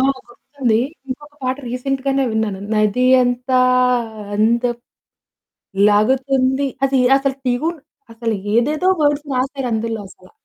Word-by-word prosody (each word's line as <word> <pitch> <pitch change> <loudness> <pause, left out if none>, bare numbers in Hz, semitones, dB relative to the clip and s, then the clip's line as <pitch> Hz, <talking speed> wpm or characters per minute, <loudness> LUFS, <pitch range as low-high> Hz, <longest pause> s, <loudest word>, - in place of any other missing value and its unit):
ఆ! - - +2 0.3
గుర్తుంది. 245 -2 -2 0.3
ఇంకొక 290 +3 -8
పాట 255 0 -1
రీసెంట్‌గానే 270 +2 -1
విన్నాను 220 -3 -2
నది 215 +3 +2 0.2
అంతా 250 +1 0 0.8
అందమ్ 235 +3 +1 1.1
లాగుతుంది 265 +5 +2 0.2
అది 270 -1 +2 0.2
అసలు 275 -1 0
ట్యూన్ 300 +7 -1 0.3
అసలు 225 0 -2 0.2
ఏదేదో 300 +10 +2
వర్డ్స్ 290 0 +1
రాసారు 265 +1 -2
అందులో 225 0 -2
అసలా. 185 0 -18
255 Hz, 110 wpm, -19 LUFS, 230-275 Hz, 1.1 s, ఆ